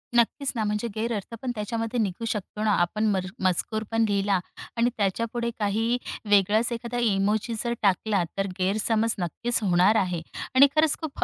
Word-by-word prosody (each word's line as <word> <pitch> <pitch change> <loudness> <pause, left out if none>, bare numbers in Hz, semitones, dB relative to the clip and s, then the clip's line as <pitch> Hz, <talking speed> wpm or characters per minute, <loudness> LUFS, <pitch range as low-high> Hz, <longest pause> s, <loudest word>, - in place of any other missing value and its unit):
नक्कीच 250 +4 +2
ना, 220 - 0
म्हणजे 210 +2 -1
गैरअर्थ 225 -1 -3
पण 255 - -2
त्याच्यामध्ये 225 +3 -2
निघू 205 +1 -2
शकतो 210 -1 -4
ना. 215 - +3
आपण 210 +5 0
मर 190 -1 0 0.2
मजकूर 215 +4 0
पण 225 0 +2
लिहिला 200 -1 +1 0.4
आणि 235 +1 +3
त्याच्यापुढे 230 +4 -1
काही 225 +4 +1 0.3
वेगळाच 205 +4 +3
एखादा 235 +1 -4
इमोजी 210 +1 +1
जर 235 -1 -1
टाकला 200 -1 +2
तर 195 0 0
गैरसमज 215 +4 +1
नक्कीच 230 +8 0
होणार 185 +3 +4
आहे 180 -5 0 0.3
आणि 275 +2 +8
खरंच 310 -1 +4
खूप 315 -3 -3
220 Hz, 160 wpm, -26 LUFS, 195-235 Hz, 0.4 s, आणि